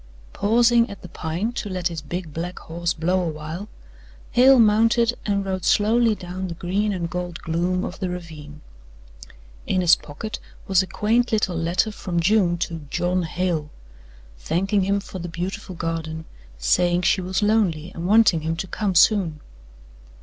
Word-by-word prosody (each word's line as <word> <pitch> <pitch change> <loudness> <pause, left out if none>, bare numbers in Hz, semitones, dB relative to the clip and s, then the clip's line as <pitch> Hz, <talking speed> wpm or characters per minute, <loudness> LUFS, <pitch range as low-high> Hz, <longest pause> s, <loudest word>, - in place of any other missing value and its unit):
XVIII - - -24
Pausing 235 +2 +3
at 200 - -10
the 180 - -9
Pine 170 +8 -3
to 210 - -4
let 185 -1 -1
his 165 -3 -5
big 165 +1 -6
black 175 +3 -5
horse 170 +1 -3
blow 180 +2 0
a 175 - -2
while, 160 +6 -6 0.6
Hale 260 +3 +6
mounted 230 +1 +4
and 200 -1 0
rode 190 -1 -3
slowly 225 +1 +3
down 185 0 -6
the 170 - -6
green 195 +5 -1
and 180 -4 -2
gold 175 0 -4
gloom 175 +3 0
of - - -7
the 185 -2 -2
ravine. 155 -4 -8 1.1
In 185 - +1
his 175 -1 +6
pocket 205 +9 -7 0.3
was 190 -1 +4
a 190 - -4
quaint 235 +6 +1
little 205 -5 +1
letter 170 +6 0
from 180 -4 -3
June 180 -1 +3
to 165 -1 -3
"John 180 +4 0
Hail"; 170 -2 -2 0.7
thanking 195 - 0
him 200 +1 +1
for 190 - -8
the 175 0 -5
beautiful 180 +2 -5
garden, 160 -1 -4 0.3
saying 175 0 +2
she 185 - +3
was 185 +3 -1
lonely, 190 -6 +1
and 170 +1 -4
wanting 210 -5 +5
him 160 +1 -2
to 165 - -4
come 195 0 -2
soon. 175 -5 +4
180 Hz, 170 wpm, -23 LUFS, 165-205 Hz, 1.1 s, Hale